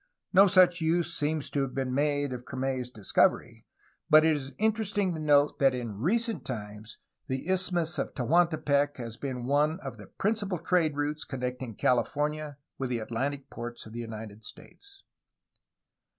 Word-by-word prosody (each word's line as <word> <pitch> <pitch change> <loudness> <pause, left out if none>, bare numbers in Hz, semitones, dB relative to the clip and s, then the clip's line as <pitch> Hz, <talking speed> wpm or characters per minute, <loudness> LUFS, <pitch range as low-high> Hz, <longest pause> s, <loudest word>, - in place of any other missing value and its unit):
No 195 +2 +8
such 185 -2 +5
use 170 +1 +1
seems 150 0 -1
to 145 - 0
have 135 -2 -3
been 130 -2 -1
made 145 -1 0
of 125 -1 -6
Crame's 130 -1 -3
discovery, 105 -5 0 0.4
but 155 +1 +7
it 160 -1 +4
is 135 -2 -6
interesting 205 -3 +1
to 160 - -5
note 145 -1 +3
that 135 -2 +4
in 115 -5 -5
recent 220 - +1
times 105 -1 -7 0.3
the 130 +4 -3
Isthmus 180 -3 0
of - - -3
Tehuantepec 145 0 +2
has 115 -3 -6
been 130 -3 -4
one 150 +5 +2
of - - -7
the - - -12
principal 205 -3 -1
trade 165 -2 +1
routes 145 +1 -2
connecting 125 -3 -5
California 150 +5 0 0.2
with 130 -2 -2
the 125 - 0
Atlantic 135 +5 -3
ports 120 0 -7
of 110 - -11
the 120 - -5
United 110 -2 -8
States. 400 - -13
145 Hz, 160 wpm, -29 LUFS, 125-170 Hz, 0.4 s, No